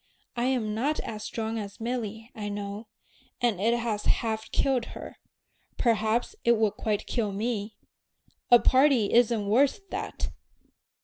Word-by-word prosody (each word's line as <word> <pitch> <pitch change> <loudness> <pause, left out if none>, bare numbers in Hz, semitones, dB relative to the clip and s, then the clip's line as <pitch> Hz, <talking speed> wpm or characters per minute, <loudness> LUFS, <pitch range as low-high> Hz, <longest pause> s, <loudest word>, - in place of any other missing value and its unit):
I'm 240 -3 0
not 275 +8 0
as 215 -1 -6
strong 225 0 -3
as 200 -2 -7
Milly, 225 -1 -4
I 210 -1 -5
know, 205 +1 -5 0.5
and 230 -7 +1
it 230 +3 +3
has 225 -3 -2
half 220 -1 0
killed 260 -4 +1
her; - - -9 0.6
perhaps 230 - +1
it 235 -1 +4
would 215 -2 +2
quite 210 -2 -2
kill 220 -4 -1
me. 215 +1 -3 0.7
A 245 - +10
party 260 -3 +4
isn't 230 -3 +4
worth 275 - +2
that!" - - -4
225 Hz, 135 wpm, -28 LUFS, 210-240 Hz, 0.7 s, A